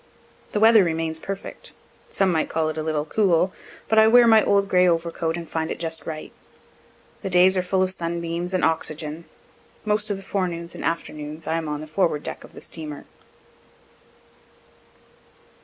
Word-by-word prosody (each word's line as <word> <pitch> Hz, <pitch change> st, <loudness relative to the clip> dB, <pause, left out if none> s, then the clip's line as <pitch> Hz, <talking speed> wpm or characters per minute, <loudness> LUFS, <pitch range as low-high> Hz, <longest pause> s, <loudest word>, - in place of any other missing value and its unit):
The 210 Hz, -, +1 dB
weather 220 Hz, -1 st, +7 dB
remains 160 Hz, -1 st, -2 dB
perfect; 195 Hz, +3 st, -7 dB, 0.4 s
some 195 Hz, -2 st, +1 dB
might 160 Hz, -2 st, 0 dB
call 160 Hz, -1 st, 0 dB
it 155 Hz, -, -5 dB
a -, -, -1 dB
little 155 Hz, -1 st, -1 dB
cool, 185 Hz, 0 st, +2 dB, 0.3 s
but 220 Hz, -, +4 dB
I 220 Hz, -, +7 dB
wear 240 Hz, +2 st, +7 dB
my 220 Hz, -2 st, +6 dB
old 200 Hz, 0 st, +2 dB
gray 180 Hz, -1 st, +4 dB
overcoat 165 Hz, -1 st, 0 dB
and 170 Hz, -1 st, -7 dB
find 160 Hz, 0 st, -3 dB
it -, -, -3 dB
just 165 Hz, -1 st, -4 dB
right. 155 Hz, -1 st, -6 dB, 0.9 s
The 195 Hz, -, -3 dB
days 185 Hz, +1 st, +5 dB
are 185 Hz, -, +2 dB
full 185 Hz, +1 st, +1 dB
of 185 Hz, -, 0 dB
sunbeams 170 Hz, 0 st, -3 dB
and 185 Hz, -, +2 dB
oxygen. 160 Hz, 0 st, -2 dB, 0.6 s
Most 210 Hz, 0 st, +1 dB
of 205 Hz, -, -1 dB
the 195 Hz, -, -11 dB
forenoons 175 Hz, -3 st, -3 dB
and -, -, -8 dB
afternoons 155 Hz, -1 st, -4 dB
I 160 Hz, -, -1 dB
am 160 Hz, -2 st, -3 dB
on 150 Hz, 0 st, -3 dB
the -, -, -6 dB
forward 155 Hz, -1 st, 0 dB
deck -, -, -6 dB
of -, -, -15 dB
the -, -, -11 dB
steamer. 150 Hz, -3 st, -7 dB
170 Hz, 175 wpm, -23 LUFS, 160-190 Hz, 0.9 s, weather